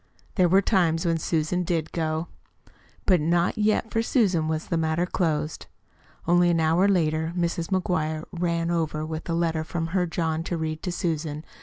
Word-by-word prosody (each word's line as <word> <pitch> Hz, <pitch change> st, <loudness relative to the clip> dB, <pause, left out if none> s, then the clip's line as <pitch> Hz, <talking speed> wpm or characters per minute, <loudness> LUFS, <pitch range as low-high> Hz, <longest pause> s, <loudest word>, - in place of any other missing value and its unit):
There 180 Hz, -4 st, +3 dB
were 195 Hz, +3 st, +5 dB
times 170 Hz, -5 st, +2 dB
when 165 Hz, -1 st, +1 dB
Susan 160 Hz, +3 st, 0 dB
did 165 Hz, -2 st, -1 dB
go. 160 Hz, 0 st, -2 dB, 0.8 s
But 180 Hz, -5 st, +4 dB
not 170 Hz, +3 st, +1 dB
yet 215 Hz, +1 st, +1 dB
for 225 Hz, -, +1 dB
Susan 195 Hz, -, +2 dB
was 160 Hz, 0 st, -2 dB
the -, -, -2 dB
matter 160 Hz, +1 st, +1 dB
closed. 160 Hz, -4 st, -2 dB, 0.6 s
Only 175 Hz, 0 st, +4 dB
an 170 Hz, -1 st, +2 dB
hour 165 Hz, +4 st, +3 dB
later 160 Hz, -3 st, +1 dB
Mrs. 170 Hz, -1 st, -1 dB
McGuire 160 Hz, -5 st, -1 dB
"ran 170 Hz, -1 st, -1 dB
over" 155 Hz, -2 st, -1 dB
with 160 Hz, +1 st, -6 dB
a 165 Hz, -, +1 dB
letter 165 Hz, -2 st, 0 dB
from 165 Hz, +1 st, -3 dB
her 180 Hz, -2 st, +2 dB
John 160 Hz, -1 st, -1 dB
to 170 Hz, -, -2 dB
read 155 Hz, -1 st, -3 dB
to 180 Hz, -, -3 dB
Susan. 155 Hz, -3 st, -2 dB
165 Hz, 175 wpm, -25 LUFS, 160-175 Hz, 0.8 s, were